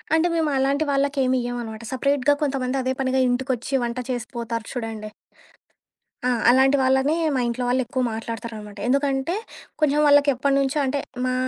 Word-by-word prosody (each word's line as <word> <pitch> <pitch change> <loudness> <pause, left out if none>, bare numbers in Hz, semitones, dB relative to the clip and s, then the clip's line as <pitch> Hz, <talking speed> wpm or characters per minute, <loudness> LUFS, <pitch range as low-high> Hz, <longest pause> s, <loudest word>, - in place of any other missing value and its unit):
అంటే, 325 +2 +3
మేము 320 -2 +1
అలాంటి 275 +3 +1
వాళ్ళకేమియ్యమనమాట, 255 -5 -1
సపరేట్‌గా 275 +1 +2
కొంతమంది 265 -2 -1
అదే 260 +1 0
పనిగా 265 0 +1
ఇంటికొచ్చి 250 0 -2
వంట 235 +1 -4
చేసిపోతారు 235 -2 -4
చూడండి. 225 -3 -5 1.2
ఆ! - - +3 0.2
అలాంటి 265 +3 +5
వాళ్ళని 265 +3 +2 0.2
మా - - +1
ఇంట్లో 240 +1 -2
వాళ్ళెక్కువ 255 0 0
మాట్లాడతారనమాట. 220 -2 -7
ఎందుకంటే, 275 +3 +1 0.5
కొంచెం 295 -1 +3
వాళ్ళకెప్పటినుంచో 280 -1 +3
అంటే, 275 +1 0 0.3
మా 255 - 0
260 Hz, 125 wpm, -23 LUFS, 240-275 Hz, 1.2 s, అలాంటి